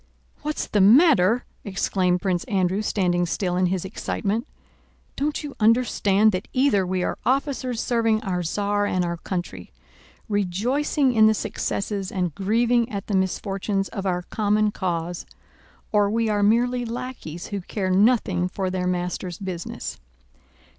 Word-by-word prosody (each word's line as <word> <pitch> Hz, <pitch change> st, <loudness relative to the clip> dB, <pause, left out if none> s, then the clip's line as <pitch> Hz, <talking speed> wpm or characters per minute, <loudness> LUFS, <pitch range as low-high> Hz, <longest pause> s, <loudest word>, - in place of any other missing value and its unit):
"What's 300 Hz, +1 st, -2 dB
the 205 Hz, -, +1 dB
matter?" 240 Hz, -, +5 dB, 0.2 s
exclaimed 185 Hz, -2 st, 0 dB
Prince 180 Hz, -3 st, 0 dB
Andrew 195 Hz, -4 st, 0 dB
standing 175 Hz, -4 st, +1 dB
still 180 Hz, +1 st, -1 dB
in 185 Hz, 0 st, +2 dB
his 185 Hz, 0 st, -2 dB
excitement. 210 Hz, +3 st, -2 dB, 0.7 s
"Don't 295 Hz, +3 st, -2 dB
you 290 Hz, -2 st, -7 dB
understand 215 Hz, -2 st, +3 dB
that 185 Hz, 0 st, -3 dB
either 255 Hz, -8 st, +2 dB
we 185 Hz, 0 st, -1 dB
are -, -, -2 dB
officers 260 Hz, -2 st, 0 dB
serving 225 Hz, -3 st, +1 dB
our 180 Hz, -3 st, -1 dB
Tsar 205 Hz, +4 st, 0 dB
and 185 Hz, -2 st, 0 dB
our 170 Hz, 0 st, -3 dB
country, 170 Hz, -, -5 dB, 0.6 s
rejoicing 245 Hz, -, +1 dB
in 220 Hz, -1 st, +6 dB
the 220 Hz, -, +3 dB
successes 200 Hz, -1 st, -3 dB
and 180 Hz, -5 st, -1 dB
grieving 230 Hz, -, +1 dB
at 200 Hz, -1 st, -4 dB
the 205 Hz, -, -1 dB
misfortunes 195 Hz, +1 st, -1 dB
of 195 Hz, -1 st, -4 dB
our 180 Hz, -1 st, -1 dB
common 210 Hz, +2 st, +1 dB
cause, 175 Hz, -3 st, -3 dB, 0.6 s
or 205 Hz, -1 st, +3 dB
we 225 Hz, +1 st, 0 dB
are 205 Hz, -1 st, +1 dB
merely 245 Hz, +4 st, +2 dB
lackeys 240 Hz, -8 st, -6 dB
who 200 Hz, -2 st, -3 dB
care 185 Hz, +1 st, -3 dB
nothing 195 Hz, -3 st, +3 dB
for 185 Hz, 0 st, -3 dB
their 180 Hz, -1 st, -1 dB
master's 180 Hz, 0 st, -2 dB
business. 185 Hz, -4 st, -6 dB
200 Hz, 145 wpm, -24 LUFS, 185-230 Hz, 0.7 s, in